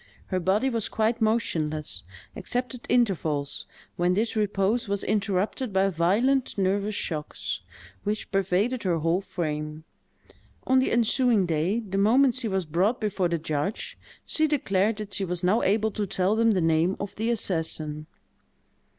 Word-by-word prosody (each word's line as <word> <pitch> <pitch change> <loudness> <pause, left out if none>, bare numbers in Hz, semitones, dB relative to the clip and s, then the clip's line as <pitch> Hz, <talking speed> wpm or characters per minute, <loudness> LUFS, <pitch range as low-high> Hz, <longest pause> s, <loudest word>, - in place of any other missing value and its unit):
Her 185 - +2
body 195 +8 +1
was 230 -5 -1
quite 225 +2 0
motionless, 155 - 0 0.3
except 250 0 -3
at 250 - -10
intervals, 160 - 0 0.3
when 175 +1 +2
this 220 +3 0
repose 210 +2 +1
was 200 0 -1
interrupted 205 +4 -1
by 190 0 +2
violent 215 - +1
nervous 200 +2 0
shocks, 155 -6 -4 0.4
which 210 +1 -3
pervaded 195 +6 +1
her 175 -3 +1
whole 165 +4 +1
frame. 155 -4 -4 0.8
On 260 0 +4
the 260 - +1
ensuing 235 -2 +3
day, 170 +7 0
the 195 -3 -3
moment 245 +6 +4
she 255 -2 -2
was 190 -3 -1
brought 185 +10 +1
before 200 -4 0
the 170 0 0
judge, 155 +4 -3 0.3
she 315 0 +2
declared 215 -8 +1
that 210 -1 -7
she 200 - -1
was 180 -1 -2
now 195 +6 +3
able 215 +2 +2
to 205 0 -3
tell 190 +2 +1
them 230 0 +3
the 185 - +1
name 165 +3 +2
of 200 0 -5
the 225 +2 -1
assassin. 160 -8 -1
195 Hz, 155 wpm, -26 LUFS, 175-225 Hz, 0.8 s, On